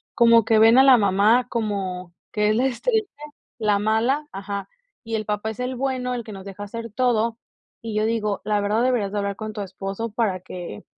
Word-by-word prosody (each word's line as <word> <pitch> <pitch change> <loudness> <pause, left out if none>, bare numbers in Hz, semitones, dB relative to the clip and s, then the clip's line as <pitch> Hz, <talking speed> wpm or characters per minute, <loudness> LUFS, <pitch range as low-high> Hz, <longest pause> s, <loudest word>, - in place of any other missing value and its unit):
como 230 -3 +6
que 220 -1 +4
ven 225 +2 +7
a 265 - +8
la 265 -2 +7
mamá 210 +4 +3
como 190 -6 -3 0.2
que 210 0 +2
es 215 - +2
la 250 - +2
estrella 430 - 0 0.5
la 210 -2 +2
mala 235 +8 +1
Ajá, 200 +1 -5 0.4
y 225 - -3
el 215 - -1
papá 210 +1 -2
es 220 - -12
el 255 +1 -2
bueno, 255 -1 -2
el 240 - -4
que 215 - -8
nos 195 -1 -9
deja 200 +1 -8
hacer 230 +2 -7
todo. 235 -2 +1 0.4
Y 225 -2 -5
yo 215 - +1
digo, 215 -3 -1
la 210 -1 +1
verdad 210 +3 +1
deberías 240 -6 +1
de 210 - -1
hablar 200 0 -2
con 215 -1 -6
tu 210 - -5
esposo 195 +3 -5
para 205 -5 -1
que, 175 - -8
220 Hz, 215 wpm, -23 LUFS, 200-235 Hz, 0.5 s, a